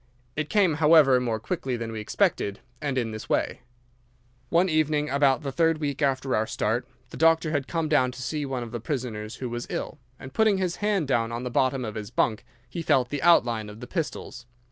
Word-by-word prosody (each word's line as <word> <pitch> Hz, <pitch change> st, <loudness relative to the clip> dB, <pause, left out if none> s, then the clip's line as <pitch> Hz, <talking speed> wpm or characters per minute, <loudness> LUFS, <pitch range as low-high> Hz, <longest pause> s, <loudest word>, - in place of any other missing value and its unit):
It 155 Hz, 0 st, -2 dB
came, 200 Hz, -6 st, +3 dB
however, 150 Hz, -5 st, +6 dB
more 115 Hz, -3 st, -1 dB
quickly 135 Hz, -, -3 dB
than 115 Hz, -1 st, -5 dB
we 110 Hz, -, -5 dB
expected, 100 Hz, -1 st, 0 dB, 0.2 s
and 140 Hz, -3 st, -2 dB
in 115 Hz, -3 st, -1 dB
this 110 Hz, 0 st, -8 dB
way. -, -, 0 dB, 0.9 s
"'One 175 Hz, +2 st, +3 dB
evening, 155 Hz, -2 st, +1 dB
about 140 Hz, 0 st, +3 dB
the 140 Hz, -, -3 dB
third 165 Hz, +3 st, +2 dB
week 145 Hz, -2 st, -3 dB
after 135 Hz, -1 st, +1 dB
our 110 Hz, +1 st, 0 dB
start, 120 Hz, +4 st, -1 dB, 0.2 s
the -, -, -8 dB
doctor 165 Hz, 0 st, +3 dB
had 145 Hz, -3 st, -1 dB
come 165 Hz, -2 st, -1 dB
down 130 Hz, -4 st, +3 dB
to 130 Hz, -, -8 dB
see 150 Hz, +4 st, -2 dB
one 135 Hz, -3 st, -3 dB
of 115 Hz, -, -8 dB
the 120 Hz, -, -4 dB
prisoners 115 Hz, -4 st, -4 dB
who 130 Hz, -, -5 dB
was 120 Hz, 0 st, -5 dB
ill, -, -, -4 dB, 0.2 s
and 130 Hz, 0 st, -10 dB
putting 220 Hz, -3 st, +3 dB
his 185 Hz, -2 st, -1 dB
hand 205 Hz, -7 st, 0 dB
down 115 Hz, -4 st, +1 dB
on 120 Hz, +1 st, -4 dB
the 125 Hz, -, -4 dB
bottom 130 Hz, +1 st, +1 dB
of 110 Hz, -, -5 dB
his 105 Hz, -2 st, -6 dB
bunk 115 Hz, -1 st, 0 dB, 0.2 s
he 165 Hz, +7 st, -5 dB
felt 135 Hz, -6 st, +2 dB
the 145 Hz, -1 st, -3 dB
outline 120 Hz, -10 st, +3 dB
of 105 Hz, +1 st, -11 dB
the 125 Hz, -, -7 dB
pistols. 150 Hz, -5 st, -5 dB
135 Hz, 215 wpm, -26 LUFS, 120-155 Hz, 0.9 s, however